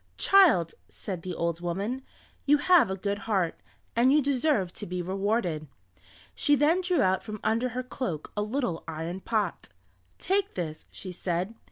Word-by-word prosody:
"Child," 335 - +5 0.2
said 185 -4 -6
the 180 0 -5
old 170 0 -2
woman, 200 +9 -2 0.5
"you 295 +1 +6
have 345 - +5
a 190 - -1
good 200 +1 -2
heart, 185 -6 0 0.4
and 245 +3 +4
you 300 - +5
deserve 270 - +1
to - - -5
be 180 +1 -3
rewarded." 185 -3 -1 0.7
She 290 - +3
then 310 +6 +3
drew 360 -5 +2
out 185 0 +2
from 215 -1 -7
under 230 +3 +1
her 255 - -1
cloak 245 - -4
a 210 - 0
little 215 -6 -2
iron 165 +3 -4
pot. 215 +1 -2 0.5
"Take 395 +2 0
this," 160 -4 -5
she 185 - -8
said. 180 +3 -2
205 Hz, 165 wpm, -28 LUFS, 175-265 Hz, 0.7 s, you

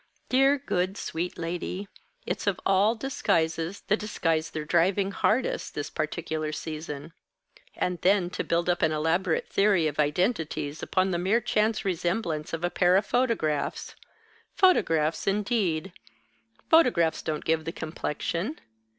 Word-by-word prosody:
Dear, 270 +2 +4
good, 190 -8 -1
sweet 175 +2 -4
lady, 175 +3 -4 0.4
it's - - -3
of 195 -3 +1
all 200 +4 +4
disguises 165 -8 -1
the 210 - +1
disguise 165 -7 -1
they're 155 -1 -5
driving 185 +4 +2
hardest, 230 +5 0
this 145 0 -4
particular 155 -1 -3
season. 155 0 -6 0.6
And 180 -1 -2
then 185 -2 +3
to - - -3
build 170 +1 0
up 175 0 +1
an 160 - +3
elaborate 160 +3 0
theory 195 -5 +3
of 150 -1 -2
identities 155 -2 0
upon 190 0 +1
the 175 - 0
mere 195 +6 +2
chance 215 -1 0
resemblance 175 -3 -1
of 165 +1 -4
a 175 - 0
pair 180 0 +3
of 195 +2 +3
photographs! 230 - -1 0.6
Photographs 165 - +3
indeed! 195 -4 0 0.8
Photographs 245 - +4
don't 155 -1 -3
give 160 -1 +1
the 165 - -2
complexion. 170 - -3
175 Hz, 135 wpm, -27 LUFS, 160-200 Hz, 0.8 s, Dear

